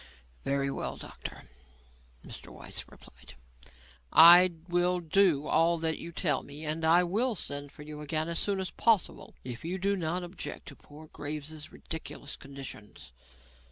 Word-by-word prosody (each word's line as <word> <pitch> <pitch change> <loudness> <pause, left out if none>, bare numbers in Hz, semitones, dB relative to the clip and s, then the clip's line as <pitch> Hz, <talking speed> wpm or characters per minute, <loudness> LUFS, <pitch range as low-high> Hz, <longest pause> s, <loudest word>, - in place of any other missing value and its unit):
"Very 140 0 0
well, - - -4
doctor," 60 +2 -8 0.8
Mr. - - -10
Weiss - - -5
replied, 65 +1 -16 0.8
"I 175 +2 +9
will 175 0 +2
do 165 -3 +3
all 165 +2 +3
that 160 -1 -1
you 170 - -7
tell 170 -2 0
me 145 +3 -8
and 155 +2 -2
I 165 +3 +5
will 220 +7 0
send 145 -5 -4
for 150 - -12
you 150 0 -8
again 155 +2 -1
as 170 -1 0
soon 200 -2 0
as 185 -2 -3
possible, 225 -5 +1
if 120 -2 -7
you 175 +3 -3
do 200 +2 +1
not 175 0 -2
object 175 +1 -7
to 140 - -12
poor 150 +3 -14
Graves's 150 0 -7
ridiculous 160 -2 -7
conditions. 135 - -10
160 Hz, 155 wpm, -30 LUFS, 145-175 Hz, 0.8 s, I